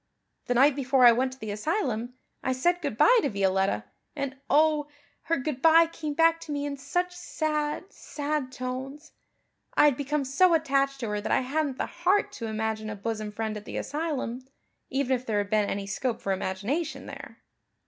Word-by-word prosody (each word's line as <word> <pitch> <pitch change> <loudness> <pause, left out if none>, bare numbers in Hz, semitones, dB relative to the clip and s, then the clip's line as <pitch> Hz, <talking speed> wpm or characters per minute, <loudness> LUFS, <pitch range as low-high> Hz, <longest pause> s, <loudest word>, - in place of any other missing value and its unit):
The 245 - +1
night 275 +3 +5
before 265 -2 +3
I 240 - +10
went 255 +2 0
to 260 - -15
the 215 -3 -5
asylum 245 - -2 0.3
I 260 - 0
said 350 +7 +1
good 285 -8 -3
bye - - +6
to 285 - 0
Violetta, 190 - +1 0.3
and 275 -2 -3
oh, 300 -1 +3 0.4
her 330 0 +1
good 270 -1 -3
bye 330 +1 +7
came 315 -3 -5
back 330 +1 +4
to 325 - -8
me 285 0 -2
in 285 -1 -3
such 355 +6 -2
sad, 310 +2 -2
sad 290 -3 -3
tones. 265 +4 -6 0.6
I - - +6
had 285 -4 +4
become 285 0 -1
so 335 +6 +4
attached 275 -3 +1
to 230 - -2
her 210 0 -2
that - - -3
I - - +3
hadn't 280 +1 -1
the - - -1
heart 365 +4 +1
to 230 - -6
imagine 220 0 -2
a 215 - -4
bosom 215 0 -4
friend 220 0 -3
at 210 0 -8
the - - -5
asylum, 285 -5 -3 0.5
even 265 -1 +1
if 250 - -5
there 215 -2 0
had 205 0 -1
been 210 -1 +2
any 200 0 -3
scope 225 +4 -2
for 195 - -2
imagination 215 - -3
there." - - -9
270 Hz, 195 wpm, -27 LUFS, 225-305 Hz, 0.6 s, I